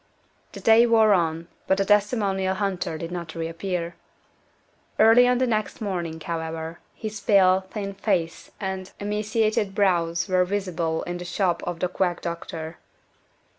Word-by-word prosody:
The - - -8
day 230 +1 +5
wore 220 -2 +5
on, 165 -2 0 0.2
but 190 - +3
the 195 - +1
testimonial 200 -2 +1
hunter 190 -5 -2
did 165 +2 -6
not 170 -2 -6
reappear. 170 +1 -3 1.0
Early 235 +3 +7
on 250 0 +3
the 255 - +2
next 215 -3 -1
morning, 175 -6 -3
however, 160 0 -5 0.2
his 215 -1 -6
pale, 190 -2 +4
thin 200 -1 -5
face 190 -5 -2
and 190 -1 -4
emaciated 210 -1 0
brows 170 -4 +1
were 185 -1 +3
visible 180 -4 -2
in 175 0 -5
the - - -5
shop 175 -1 0
of 175 -1 -4
the 180 - +2
quack 180 -1 -1
doctor. 165 -1 -6
190 Hz, 145 wpm, -24 LUFS, 170-205 Hz, 1.0 s, Early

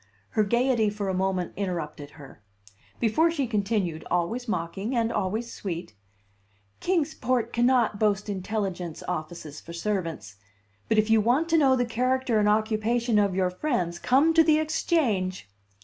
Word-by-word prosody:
Her 215 - +2
gayety 235 0 +2
for 205 -1 -3
a - - 0
moment 185 -1 -1
interrupted 165 -7 -4
her, 135 -6 -13 0.6
before 245 +9 +3
she 305 -5 -1
continued, 200 -7 -1
always 220 +9 -1
mocking 195 +5 -3
and 230 -1 +1
always 220 +5 -2
sweet: 170 - -5 0.9
"Kings 330 -4 0
Port 240 -2 -1
cannot 240 -3 +2
boast 205 -2 +1
intelligence 190 -4 -3
offices 155 -3 -5
for 170 - -10
servants; 165 - -3 0.5
but 220 - +2
if 215 +1 +3
you 225 -1 +5
want 260 +10 +2
to 330 - +4
know 270 -3 +4
the 245 -1 +1
character 250 0 0
and 210 0 +3
occupation 220 +2 +1
of 200 -3 +1
your 185 -1 +1
friends, 180 - -2
come 280 - +3
to 325 0 +6
the 310 -1 +4
Exchange!" 245 - 0
215 Hz, 150 wpm, -26 LUFS, 185-245 Hz, 0.9 s, to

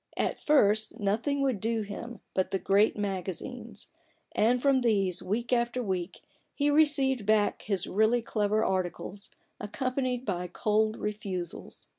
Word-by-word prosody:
At - - -1
first, 220 -6 +3
nothing 225 +8 0
would 260 -7 +1
do 225 0 0
him 215 +2 -8
but 185 - 0
the 195 - 0
great 200 +3 +3
magazines; 190 -3 -4 0.4
and 240 +3 +2
from 270 0 +3
these, 195 -6 +1
week 235 +6 -2
after 240 +1 +1
week, 185 -3 -3 0.3
he 290 0 +2
received 285 -5 +3
back 215 -1 +2
his 195 -2 -2
really 220 +4 +2
clever 215 -1 +1
articles, 185 +1 -3 0.3
accompanied 255 +3 -2
by 180 -3 -2
cold 215 +4 +1
refusals. 195 -4 -5
215 Hz, 135 wpm, -29 LUFS, 195-245 Hz, 0.4 s, first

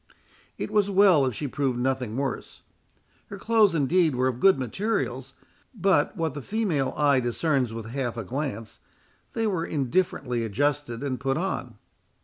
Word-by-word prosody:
It - - -4
was 205 -1 +2
well 190 -8 +5
if 125 - -3
she 145 - -3
proved 135 -2 -1
nothing 125 -2 -1
worse. 135 0 -4 0.6
Her 200 - -8
clothes, 215 -3 +3
indeed, 160 +1 +2
were 130 +1 +1
of 125 -2 -2
good 195 +5 +5
materials; 135 - -2 0.4
but, 195 +1 +2
what 160 -4 -1
the 145 - -6
female 180 - -1
eye 145 -3 +4
discerns 130 +1 0
with 115 -1 -6
half 120 0 -3
a 115 - -3
glance, 125 0 -5 0.5
they 225 - -1
were 185 -6 0
indifferently 135 -5 -1
adjusted 130 +2 -1
and 130 -3 -2
put 135 0 -1
on. - - -3
140 Hz, 155 wpm, -26 LUFS, 125-180 Hz, 0.6 s, well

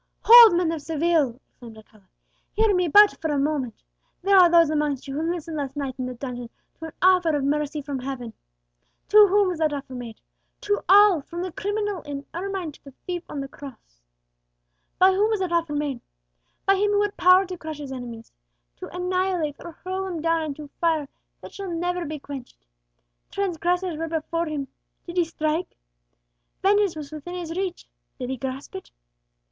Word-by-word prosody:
"Hold, 465 -5 +10
men 345 -2 +1
of 325 -2 -4
Seville!" 315 -5 +1
exclaimed 230 -3 -14
Alcala; 215 -2 -19 0.5
"hear 435 -1 +3
me 360 -1 +1
but 415 +6 +6
for 320 - -1
a 290 - 0
moment. 275 -5 -2 0.4
There 395 +1 +4
are 360 -2 +8
those 335 -2 +5
amongst 295 -3 -1
you 270 - -5
who 320 +4 -1
listened 330 -2 -5
last 275 -1 -4
night 280 -3 -3
in 255 0 -3
a 250 - -7
dungeon 245 -2 -6 0.3
to 325 - -7
an 320 - -9
offer 360 -4 +4
of 285 - -1
mercy 295 +1 -1
from 275 -1 -4
Heaven. 250 -3 -6 0.8
To 420 0 +8
whom 400 0 +3
was 350 -3 -4
that 310 -2 +1
offer 275 -2 -6
made? 240 -3 -8 0.4
To 410 0 -1
all, 400 -4 +7
from 345 +5 -6
the 370 - -4
criminal 410 0 -3
in 285 -1 -7
ermine 370 -2 -4
to - - -20
the 275 -2 -13
thief 355 -1 -3
on 285 - -4
the 275 - -5
cross. 250 - -13 1.0
By 375 +1 +6
whom 405 +3 +2
was 435 -2 0
that 370 -2 -2
offer 335 -3 0
made? 285 -4 -2 0.6
By 390 0 +4
Him 410 +2 +2
who 410 0 +3
had 415 0 -3
power 365 +2 +5
to 365 0 -6
crush 315 -3 -7
His 285 -2 -8
enemies 240 -3 -8 0.5
to - - -8
annihilate 360 -4 -1
or 340 -1 -9
hurl 375 +1 -3
them 355 -3 -4
down 330 +1 +1
into 300 -1 -6
fire 320 -4 +1 0.3
that - - -11
shall 395 -1 -6
never 350 +1 -2
be 305 +1 -5
quenched. 275 - -10 0.6
Transgressors 360 -2 -1
were 330 +1 -3
before 330 +1 -2
Him; 290 -3 -4 0.4
did 345 +1 -8
He 350 - +3
strike? 315 +1 -3 0.9
Vengeance 405 -2 +3
was 300 -2 -8
within 310 +4 -7
His 335 -2 -5
reach; 370 -1 -4 0.3
did 255 -1 -4
He 265 - -3
grasp 265 +2 -6
it? 190 - -8
325 Hz, 190 wpm, -24 LUFS, 280-365 Hz, 1.0 s, Hold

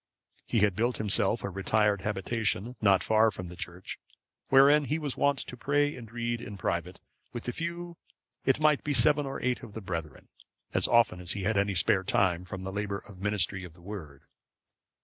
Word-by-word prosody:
He 115 - +1
had 105 -3 +3
built 120 +4 0
himself 105 +1 +1
a 100 - -2
retired 100 +1 +1
habitation 105 +3 -1
not 100 -3 +4
far 110 +1 +4
from 90 -3 -7
the 90 0 -8
church, 90 +1 -7 0.5
wherein 140 +2 +6
he 150 +3 -1
was 150 -4 -2
wont 140 -1 +2
to - - -8
pray 145 +3 +1
and 115 -3 -11
read 120 0 -3
in 105 -4 -8
private, - - -3 0.3
with 120 - -5
a - - 0
few, 170 +2 -5 0.5
it 135 +2 +2
might 150 -2 +3
be 145 -1 0
seven 145 +2 +5
or 135 - -5
eight 125 -1 0
of 115 -5 -11
the 110 - -5
brethren, 80 -6 -6 0.4
as - - +3
often 115 -6 +3
as 90 -1 -2
he 100 - -4
had 110 +3 +1
any 100 0 +1
spare 95 +2 +3
time 90 -2 +1
from 95 +1 -6
the 95 +1 -5
labour 100 -1 -3
and 95 -3 -13
ministry 100 -1 0
of 85 -3 -10
the 90 - -18
Word. 80 -9 -9
105 Hz, 200 wpm, -29 LUFS, 95-125 Hz, 0.5 s, wherein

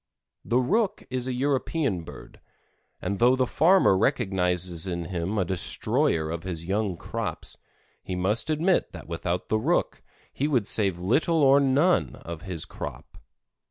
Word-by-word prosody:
The 120 - +1
Rook 195 - +1
is 130 0 -2
a 130 - -1
European 135 - 0
bird, - - -12 0.6
and 100 +2 -2
though 125 +2 +5
the 130 0 +1
farmer 170 - +4
recognizes 95 - 0
in 85 -2 -3
him 90 +4 -3
a 95 - +1
destroyer 85 -3 0
of 85 0 -4
his 85 -2 -5
young 100 -1 -1
crops, - - -5 0.5
he 95 - -5
must 100 +10 0
admit 165 +4 +1
that 85 - -10
without 85 +1 -3
the 110 - +2
Rook 160 +10 0 0.3
he 145 - -1
would 125 -8 +1
save 100 -6 +2
little 145 - +2
or 135 +1 +6
none 140 +6 +2
of 85 -1 -8
his 90 -3 -3
crop. - - -8
105 Hz, 155 wpm, -26 LUFS, 90-135 Hz, 0.6 s, or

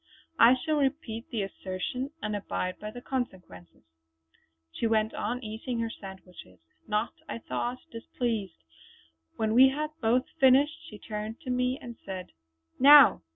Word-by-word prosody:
I 235 +3 +8
shall 305 +4 -1
repeat 265 -5 -2
the 225 -6 -2
assertion 195 +7 -4
and 210 0 -2
abide 185 -2 -3
by 210 - -6
the 245 +3 -10
consequences." 180 - -6 0.9
She 230 - -1
went 220 -1 +1
on 250 +1 -3
eating 225 +3 -5
her 230 0 -2
sandwiches, 190 - -12 0.3
not, 210 +2 -1 0.2
I - - -3
thought, 240 +2 -3
displeased. 225 - -4 0.7
When 220 -1 0
we 260 +3 +8
had 300 +3 -3
both 245 +4 +2
finished 275 +4 +5
she 210 - -10
turned 215 +1 -6
to 260 -5 -4
me 250 +1 0
and 240 -5 -9
said: 185 -2 -7 0.5
"Now!" 285 - +8
230 Hz, 145 wpm, -28 LUFS, 210-255 Hz, 0.9 s, I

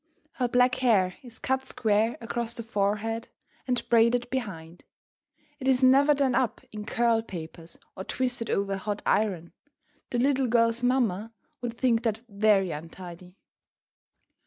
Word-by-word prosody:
Her 250 - -1
black 250 +1 +3
hair 195 -7 +3
is 240 -3 -13
cut 265 0 -1
square 220 -3 +1
across 235 0 -3
the 230 - -5
forehead 220 +1 -1 0.4
and 250 -1 -1
braided 235 +1 +3
behind. 180 -10 -5 0.8
It 265 - -4
is 260 -1 +3
never 275 +3 +6
done 270 -2 +1
up 250 -1 0
in 210 -1 -7
curl 230 -1 +2
papers 165 -5 -8 0.2
or 190 - -6
twisted 245 0 -2
over 195 0 0
a - - -2
hot 205 +1 -4
iron; 185 -6 0 0.6
the 245 - -2
little 265 +1 +2
girl's 230 0 +2
mamma 230 -4 0 0.3
would 235 -1 -4
think 240 -3 +2
that 225 -2 -1
very 200 -3 +2
untidy. 175 +3 -9
230 Hz, 145 wpm, -27 LUFS, 200-245 Hz, 0.8 s, never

